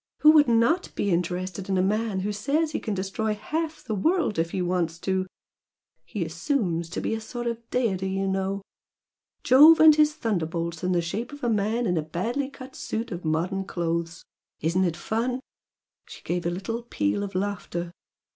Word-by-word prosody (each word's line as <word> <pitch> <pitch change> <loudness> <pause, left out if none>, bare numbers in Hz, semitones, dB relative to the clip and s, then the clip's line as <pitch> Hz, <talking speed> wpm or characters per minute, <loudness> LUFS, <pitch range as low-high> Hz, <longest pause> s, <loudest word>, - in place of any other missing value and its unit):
Who 305 - +9
would 300 -2 +6
not 235 +10 +3
be 200 - 0
interested 180 +2 -2
in 190 - +1
a 185 - +3
man 210 0 0
who 205 +2 -1
says 290 +9 0
he - - -2
can 215 - -3
destroy 200 +3 -2
half 315 +9 -3
the 220 - -3
world 285 - +1
if 165 0 +1
he 185 - -3
wants 175 -2 0
to! 190 -1 0 0.8
He 205 -7 -3
assumes 170 - -1
to - - -4
be - - -1
a 225 - -3
sort 240 +2 -6
of 235 -1 -4
deity, 195 -7 0
you 195 0 -1
know! 195 +1 -1 0.8
Jove 300 +6 +8
and 315 -1 +9
his 300 0 +3
thunderbolts 170 - -2
in 180 - +1
the 175 -1 +1
shape 225 - -4
of 290 0 -11
a 240 - +2
man 220 +3 +1
in 180 -4 +1
a - - +2
badly 230 - -2
cut 265 -1 -11
suit 225 +2 -4
of 175 -1 -5
modern 170 +5 0
clothes! 170 -2 -3 0.3
Isn't 170 +4 +1
it 170 -2 -1
fun!" 235 +7 -1 0.7
She - - -12
gave 175 -1 -2
a - - +2
little 195 +7 -3
peal 105 - -1
of 200 -2 -5
laughter. 185 -3 -3
195 Hz, 190 wpm, -26 LUFS, 175-240 Hz, 0.8 s, Who